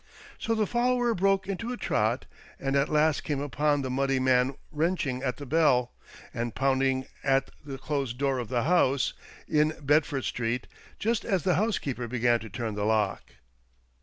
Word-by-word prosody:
So 225 - 0
the 215 -1 +2
follower 245 +1 +1
broke 195 0 +1
into 215 +5 -3
a 250 - -4
trot, - - 0 0.3
and 135 0 -1
at 140 0 +2
last 155 0 +2
came 145 -2 -2
upon 145 +1 0
the 130 - -3
muddy 135 0 +1
man 130 +1 +2 0.2
wrenching 150 -5 -1
at 130 -2 -2
the 145 - -7
bell 135 -5 +2 0.4
and 120 -2 -3
pounding 130 -1 +1 0.2
at 135 -1 +2
the 140 -2 -6
closed 135 -3 -3
door 135 -1 0
of 120 - -5
the 120 -2 0
house 140 -5 +2 0.3
in 155 +1 +2
Bedford 145 -2 +1
Street, 120 +1 -2 0.3
just 225 +1 0
as 190 -4 0
the 185 -1 +3
housekeeper 145 - -1
began 120 0 +2
to 110 - -9
turn 110 +1 -4
the 105 0 -3
lock. 105 - 0
135 Hz, 170 wpm, -28 LUFS, 125-160 Hz, 0.4 s, the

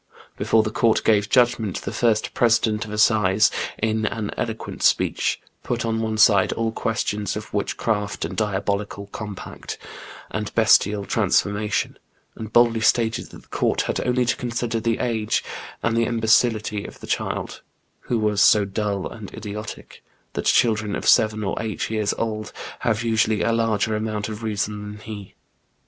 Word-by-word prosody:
Before 110 -1 +2
the 110 - -3
court 115 0 +2
gave 105 -2 +3
judgment, 120 -5 +2
the - - -4
first 110 -3 +1
president 110 -2 +2
of 105 - -9
assize, 105 -2 +4 0.3
in 110 0 0
an 105 -1 -3
eloquent - - -4
speech, - - +2 0.2
put 120 -1 -2
on 115 0 0
one 110 -1 -2
side 100 -3 +5
aU 115 0 0
questions 105 -2 -2
of 105 0 -7
witchcraft 105 0 -1
and - - -6
diabolical 100 -1 -2
compact, 105 -3 -7 0.5
and 105 -1 -3
bestial 105 -2 +4
transformation, 105 +1 0 0.4
and 110 -1 -7
boldly 115 -1 +4
stated 115 0 +2
that - - -13
the - - -26
court - - +1
had - - -2
only 125 0 +1
to 120 - +1
consider 120 -2 -2
the 115 0 0
age 110 -3 0 0.4
and 115 - +1
the 115 0 +3
imbecility 110 -2 +2
of - - -10
the - - -9
child, - - -3 0.5
who 120 - +2
was 105 -3 +1
so 105 -2 +6
dull 100 0 -2
and 105 -4 -9
idiotic 105 0 -8 0.2
— 60 +1 -42
that - - -3
children 110 -3 +2
of - - -4
seven 110 0 +4
or 95 - -1
eight 110 -1 -3
years 110 -2 0
old 110 -2 -3 0.3
have 110 0 0
usually 110 -2 +2
a 115 - +2
larger 115 -1 +1
amount 105 -1 -2
of 110 0 -6
reason 105 -1 -2
than 105 - -11
he. 105 -3 -9
110 Hz, 160 wpm, -23 LUFS, 105-115 Hz, 0.5 s, so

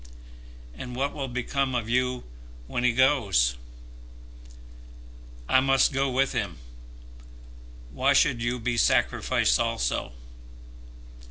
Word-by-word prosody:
"And 125 - -8
what 140 +3 -2
will 135 -2 -4
become 130 +1 -2
of 115 -3 -2
you 125 +1 0 0.4
when 120 - -3
he 125 - +4
goes?" 110 - +2 1.9
"I 130 - +4
must 135 0 +3
go 135 0 0
with 130 +1 +1
him. - - -3 1.3
Why - - +2
should 120 - +2
you 120 +1 -1
be 120 0 -2
sacrificed - - +2
also? - - -2
125 Hz, 105 wpm, -26 LUFS, 115-135 Hz, 1.9 s, he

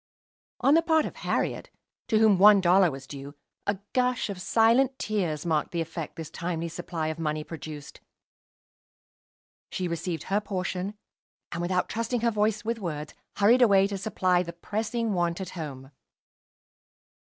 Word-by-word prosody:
On 275 +3 +5
the 330 - +6
part 320 -2 +3
of - - -7
Harriet, - - -2 0.4
to 220 - +2
whom 215 -4 +5
one 205 +1 +8
dollar 185 0 +5
was 135 -2 -8
due, 140 +1 -9 0.3
a 200 -1 +1 0.2
gush 250 -4 +1
of 185 -2 -7
silent 240 +6 +3
tears 175 -8 -2
marked 155 -3 +1
the 170 - -3
effect 165 -1 -5
this 160 -1 -7
timely 170 -1 -3
supply 165 -2 -4
of 160 +1 -5
money 155 -1 -1
produced. 150 -2 -9 1.7
She 185 - -2
received 170 -1 -3
her 200 +2 0
portion, 190 0 -3 0.6
and, 170 - -3
without 180 +1 0
trusting 230 +1 -2
her 235 0 +2
voice 215 0 0
with 230 0 -1
words, 150 -6 -5 0.2
hurried 230 +5 +5
away 200 -5 +6
to 200 0 -3
supply 185 -3 +1
the 170 -1 -6
pressing 220 +5 -2
want 175 -1 0
at 185 -2 -5
home. 140 -5 -7
185 Hz, 155 wpm, -27 LUFS, 165-215 Hz, 1.7 s, one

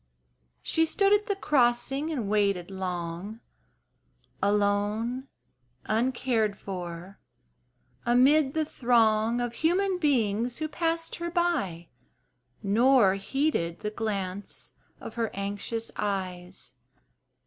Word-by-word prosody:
She 325 - +2
stood 395 +4 +3
at 415 0 +2
the 400 - 0
crossing 270 -2 +1
and 245 -9 -2
waited 200 -3 +1
long, 180 +2 -4 1.0
Alone, 210 +5 0 0.6
uncared 230 -2 0
for, 180 0 -7 0.8
amid 265 +4 +4
the 315 -1 +1
throng 230 -3 +2
Of 240 -1 -2
human 360 +7 +1
beings 240 - +1
who 310 - -2
passed 330 +1 -1
her 340 0 -3
by 300 - -1 0.7
Nor 225 0 +5
heeded 195 - -1
the 210 - -3
glance 200 -3 -4 0.3
of - - -8
her 230 -2 -1
anxious 205 +3 -4
eyes. 185 -7 -4
225 Hz, 100 wpm, -28 LUFS, 200-275 Hz, 1.0 s, Nor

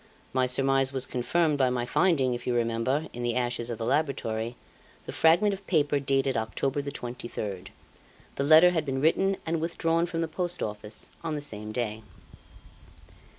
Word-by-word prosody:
My 130 0 +2
surmise 135 +1 +2
was 130 -1 0
confirmed 150 +5 0
by 130 -1 +4
my 125 -1 -1
finding, 135 -3 +2
if 120 - -6
you 125 - +1
remember, 120 +5 0
in 120 - -6
the 120 -1 -1
ashes 120 -1 -1
of 120 - -3
the 115 - -3
laboratory, 120 -5 -1 0.5
the - - -5
fragment 175 +6 +4
of 195 0 -8
paper 145 -4 +2
dated 135 -1 +1
October 130 +5 -1
the 140 0 -5
23rd. 110 -7 -6 0.7
The 140 - -2
letter 160 +5 +7
had 165 -3 0
been 135 -2 -2
written 190 +6 +2
and 165 0 -1
withdrawn 165 0 0
from 165 -1 -2
the 165 - 0
Post 175 +1 -2
Office 105 +1 -6
on 160 -2 -2
the - - -2
same 105 -7 -5
day. 110 -1 -3
135 Hz, 175 wpm, -28 LUFS, 120-160 Hz, 0.7 s, letter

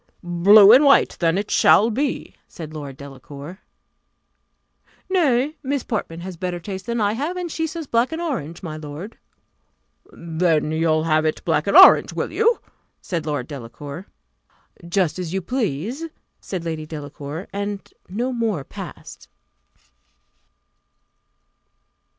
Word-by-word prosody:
"Blue 195 +4 +7
and 260 +5 +8
white 280 -1 +5
then 165 0 +2
it 205 +1 -3
shall 225 +3 +5
be," 275 +6 -2
said 155 -2 -9
Lord 145 -3 -7
Delacour. 140 +5 -10 1.5
"Nay, 300 -4 +2
Miss 280 -2 -2
Portman 170 -7 -4
has 185 +1 -6
a - - -15
better 180 -1 -3
taste 190 +3 -7
than 235 0 -1
I 205 -1 +1
have; 300 +10 -3
and 350 -2 -4
she 320 +1 -2
says 325 0 -6
black 235 +1 +1
and 320 - -4
orange, 175 - -4
my 155 -3 -5
lord." 155 +7 -9 0.9
"Then 165 -2 0
you'll 160 0 +1
have 155 -1 +2
it 155 - -2
black - - +1
and - - +4
orange, - - +8
will - - -3
you?" 460 +1 +2 0.4
said 165 -4 -4
Lord 150 -1 -2
Delacour. 145 - -8 0.8
"Just 180 -3 0
as 180 0 -4
you 190 - -1
please," 235 - -2 0.3
said 180 -3 -6
Lady 160 -2 -4
Delacour, 150 +2 -7
and 200 0 -5 0.2
no 240 +7 -2
more 225 - -1
passed. - - -10
180 Hz, 140 wpm, -22 LUFS, 155-235 Hz, 1.5 s, and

